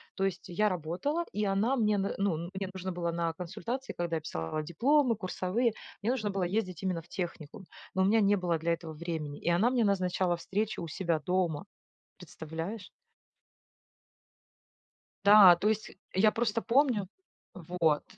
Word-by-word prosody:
То 195 - 0
есть 195 -3 -3
я 210 +4 +1
работала, 185 - -2
и 210 0 -1
она 200 +6 +1
мне 215 -4 +2
н 200 0 -1
ну 195 -5 +1 0.2
мне 190 -1 -4
нужно 190 0 -4
было 175 -1 -2
на 170 -1 -1
консультации, 230 +10 -5
когда 170 -2 -1
писала 85 - -4
дипломы 245 - +2
курсовые, 205 +4 -1 0.3
мне 225 - +2
нужно 225 -5 -1
было 195 -2 -1
ездить 185 -1 -2
именно 180 -3 -1
в 165 - -22
техникум, 175 +1 -6 0.3
но 190 - +3
у - - +3
меня 220 +3 +4
не 205 0 +4
было 175 -4 0
для 170 +1 +1
этого 165 -1 -6
времени, 155 -2 -5
и - - -1
она 185 +8 +3
мне 250 -3 +2
назначала 185 -3 +1
встречу 210 +3 -2
у - - -5
себя 170 -1 -1
дома. 180 -1 -1 0.5
Представляешь? 170 +4 -7 2.3
Да, 200 -3 +9
то 200 +5 +1
есть 220 0 -2 0.2
я 215 +3 +4
просто 230 -1 0
помню. 235 -4 +2 0.5
Вот. 170 -4 0
185 Hz, 160 wpm, -30 LUFS, 170-215 Hz, 2.3 s, Да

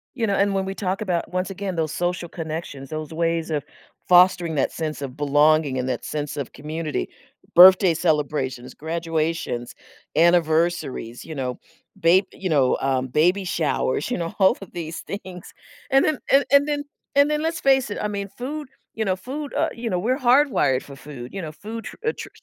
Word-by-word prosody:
You 230 -4 0
know, 200 - +1
and 200 0 +2
when 195 -1 0
we 190 - -3
talk 190 0 -2
about, 180 -5 -2
once 185 +1 -1
again, 195 -1 -4
those 160 -2 -1
social 175 -1 -2
connections, 155 -5 -6
those 155 -1 -5
ways 165 0 -1
of 150 -3 -1 0.4
fostering 175 -2 +5
that 140 - +1
sense 155 -3 -4
of 135 -2 -5
belonging 145 -1 +3
and 130 0 -2
that - - -3
sense 150 -1 -4
of 140 -4 -4
community, 155 +1 -4 0.5
birthday 185 0 +8
celebrations, 150 -6 -1
graduations, 160 -6 -3 0.4
anniversaries, 165 -7 +1
you 160 - -8
know, 125 -3 -3 0.4
bab 175 +4 +4
you 190 - -4
know, 140 -5 +3
um, 130 -1 0
baby 180 +9 +2
showers, 160 - -1
you - - 0
know, 170 -2 -4
all 190 -1 +5
of 195 - -10
these 165 -2 -5
things. 185 -3 -8 0.4
And 270 0 +5
then 310 -2 +1
and 275 +1 +6
and 280 +1 +6
then 290 -1 -1 0.3
and 285 +1 +5
then 300 0 0
let's 325 +1 -1
face 265 -3 +3
it, 205 - -4
I - - 0
mean, 200 -1 -4
food 290 +4 -5 0.3
you 220 - -1
know, 190 -2 +1
food, 275 +9 -6
uh - - +1
you 235 0 -4
know, 180 -3 0
we're 245 +8 0
hardwired 255 - +3
for 140 - -11
food. 135 -3 -10
You 195 - -4
know, 155 -3 -6
food 220 +8 -8
tr - - -8
uh, - - +4
tr - - -7
170 Hz, 195 wpm, -23 LUFS, 150-200 Hz, 0.5 s, birthday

